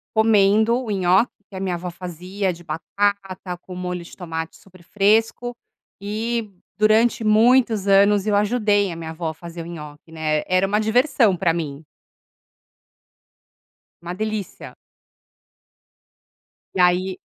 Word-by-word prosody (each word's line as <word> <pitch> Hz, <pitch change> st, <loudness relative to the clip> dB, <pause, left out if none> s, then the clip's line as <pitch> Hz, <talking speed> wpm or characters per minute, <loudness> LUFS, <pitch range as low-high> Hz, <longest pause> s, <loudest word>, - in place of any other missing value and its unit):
comendo 220 Hz, +2 st, +4 dB
o 230 Hz, -, -7 dB
nhoque 190 Hz, +2 st, +2 dB, 0.2 s
que 195 Hz, -, -14 dB
a -, -, -4 dB
minha 185 Hz, -2 st, -2 dB
avó 175 Hz, +1 st, -5 dB
fazia 185 Hz, +3 st, -4 dB
de 175 Hz, 0 st, -11 dB
batata 195 Hz, +1 st, -2 dB
com 185 Hz, -, -10 dB
molho 180 Hz, -1 st, -4 dB
de 170 Hz, -, -13 dB
tomate 160 Hz, -2 st, -5 dB
super 185 Hz, -2 st, -19 dB
fresco. 220 Hz, +5 st, +1 dB, 0.5 s
E 220 Hz, +2 st, -3 dB, 0.3 s
durante 220 Hz, +2 st, +3 dB
muitos 220 Hz, -1 st, +4 dB
anos 200 Hz, 0 st, +4 dB
eu 210 Hz, -1 st, +1 dB
ajudei 205 Hz, -2 st, +2 dB
a -, -, -6 dB
minha 160 Hz, -1 st, -6 dB
avó 160 Hz, 0 st, -4 dB
a -, -, -5 dB
fazer 170 Hz, +1 st, -9 dB
o -, -, -8 dB
nhoque, 150 Hz, -1 st, -10 dB
né. 155 Hz, -1 st, -1 dB
Era 185 Hz, +1 st, +2 dB
uma 205 Hz, +2 st, +1 dB
diversão 220 Hz, -2 st, +2 dB
pra 170 Hz, -2 st, +1 dB
mim. 155 Hz, -3 st, -5 dB, 2.2 s
Uma 175 Hz, +1 st, -5 dB
delícia. 215 Hz, 0 st, -5 dB, 2.0 s
E -, -, -2 dB
aí 180 Hz, +1 st, +2 dB
195 Hz, 135 wpm, -22 LUFS, 175-215 Hz, 2.2 s, comendo